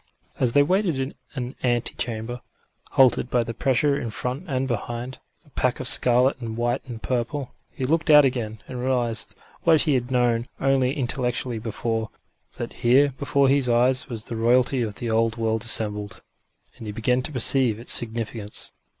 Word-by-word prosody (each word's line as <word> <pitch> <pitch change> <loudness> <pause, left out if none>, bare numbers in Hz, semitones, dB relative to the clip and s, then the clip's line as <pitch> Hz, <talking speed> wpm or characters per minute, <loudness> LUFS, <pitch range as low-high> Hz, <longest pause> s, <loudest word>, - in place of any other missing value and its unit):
As 125 -3 +1
they 145 - +5
waited 180 -1 0
in 135 +1 -3 0.2
an 125 -1 -4
ante 120 -2 0
chamber, 120 +1 -5 0.5
halted 130 -2 +4
by 120 -2 +1
the 115 0 -6
pressure 140 +4 +1
in 115 - -4
front 125 +9 -5
and 135 -3 -1
behind 120 +2 -5 0.3
a 145 - -24
pack 130 -2 -1
of - - -2
scarlet 125 +2 +4
and 115 -1 -5
white 120 +2 -1
and 115 -3 -8
purple 125 +2 -3 0.2
he - - -7
looked 160 +5 0
out 150 -2 +8
again, 115 -5 -3
and 125 - -7
realised 120 -3 0 0.3
what 160 -3 +4
he 155 - +1
had 125 -1 -1
known 120 -2 +1
only 135 -1 +2
intellectually 125 -2 -2
before, 110 0 -3 0.5
that - - -5
here 135 +4 +3
before 140 -1 +2
his 135 -2 +2
eyes 125 +2 +2
was 115 -3 -2
the 115 0 -6
royalty 125 +3 +2
of 105 -3 -3
the 120 -2 -4
old 115 +1 +1
world 110 -1 -1
assembled 105 -3 -1 0.5
and 110 - -9
he - - -4
began 125 +4 0
to 130 - -3
perceive 125 -3 +4
its 115 - -1
significance. 110 -2 -1
125 Hz, 175 wpm, -24 LUFS, 115-130 Hz, 0.5 s, out